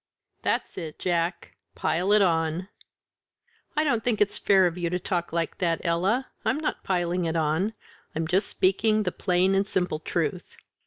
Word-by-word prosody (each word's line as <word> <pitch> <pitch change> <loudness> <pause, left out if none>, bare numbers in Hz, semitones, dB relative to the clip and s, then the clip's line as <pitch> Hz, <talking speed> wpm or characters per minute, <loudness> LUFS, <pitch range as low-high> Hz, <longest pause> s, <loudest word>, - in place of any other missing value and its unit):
"That's - - -1
it. 160 -3 -7
Jack 175 -1 -1 0.2
pile 180 +5 0
it 210 -1 +6
on!" 165 +1 0 1.1
"I 305 - +4
don't 240 -7 +1
think 235 -4 +1
it's 205 -1 +2
fair 190 -2 +5
of 170 -2 0
you 175 -2 -2
to 180 - 0
talk 175 -1 -2
like 165 -1 -2
that, 170 -2 +1
Ella; 185 +10 +1 0.2
I'm 260 - +1
not 310 - -3
piling 180 -1 0
it 165 0 -1
on; 160 +7 +1 0.4
I'm 160 0 -1
just 190 +4 +1
speaking 215 +3 +2
the 180 - -1
plain 185 +1 +1
and 195 +1 +2
simple 180 -5 -1
truth. - - -3
180 Hz, 170 wpm, -26 LUFS, 170-200 Hz, 1.1 s, it